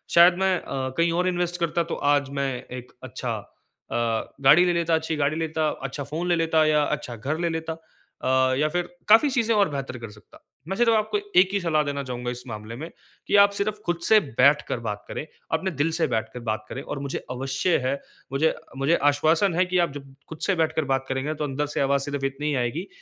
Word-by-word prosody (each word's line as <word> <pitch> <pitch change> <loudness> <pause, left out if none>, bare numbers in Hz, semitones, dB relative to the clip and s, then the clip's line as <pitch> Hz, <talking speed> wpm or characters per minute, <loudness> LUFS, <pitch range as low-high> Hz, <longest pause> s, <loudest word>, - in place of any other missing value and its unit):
शायद 175 +1 +8
मैं 190 -1 +3
अ, 130 -1 -3
कहीं 165 0 +3
और 180 +2 +1
इन्वेस्ट 175 -1 -1
करता 170 0 0
तो - - -1 0.2
आज 140 -2 +1
मैं 140 -1 +1 0.3
एक 125 0 -10
अच्छा 130 - -4 0.6
अ, - - -2 0.5
गाड़ी 150 +6 +7
ले 175 - +2
लेता 170 -1 +2
अच्छी 160 0 -1
गाड़ी 145 +1 +1
लेता, 160 -1 0
अच्छा 135 +1 -5
फ़ोन 155 +5 -4
ले 175 - +4
लेता 160 -1 +2
या 150 -1 +3
अच्छा 145 -5 -3
घर 140 +8 -3
ले 170 -1 0
लेता। 160 0 -3
अ, 130 -5 -1
या 150 +1 +2
फिर 175 +2 -2 0.2
काफ़ी 225 +7 +7
चीज़ें 230 -4 +1
और 200 -4 +3
बेहतर 135 -2 -5
कर 115 -2 -7
सकता। 105 -1 -18 0.2
मैं 190 - -2
सिर्फ़ 240 -1 +4
आपको 215 - +1 0.2
एक 185 +1 +5
ही 200 - +2
सलाह 155 -4 +1
देना 140 -1 -3
चाहूँगा 125 -1 -4
इस 125 0 -7
मामले 110 0 -7
में 155 +7 -7 0.4
कि - - +2
आप 200 0 +7
सिर्फ़ 205 +1 -2
खुद 175 -1 0
से 220 -1 +6
बैठ 140 - +3
कर 120 - -2
बात 105 -3 -5
करें, - - -5 0.3
अपने 185 +4 0
दिल 145 +1 0
से 165 +1 +1
बैठ 110 0 -1
कर 125 - -6
बात 110 -2 -3
करें 135 - -5
और 140 - -5
मुझे 140 -1 -3
अवश्य 135 +7 0
है, 130 - +1 0.4
मुझे 150 +4 +2 0.2
मुझे 140 +5 +3
आश्वासन 155 +6 +3
है 185 - +3
कि 180 0 -1
आप 170 -4 +2
जब 140 -1 -10 0.2
खुद 160 - -7
से 195 - +2
बैठकर 160 -2 0
बात 135 0 -1
करेंगे 130 +4 -1
तो 150 - -4
अंदर 145 +1 -1
से - - +1
आवाज़ 140 0 +2
सिर्फ़ 145 -1 -3
इतनी 135 +2 -3
ही 145 - 0
आएगी 130 +10 -2
150 Hz, 230 wpm, -25 LUFS, 135-175 Hz, 0.6 s, शायद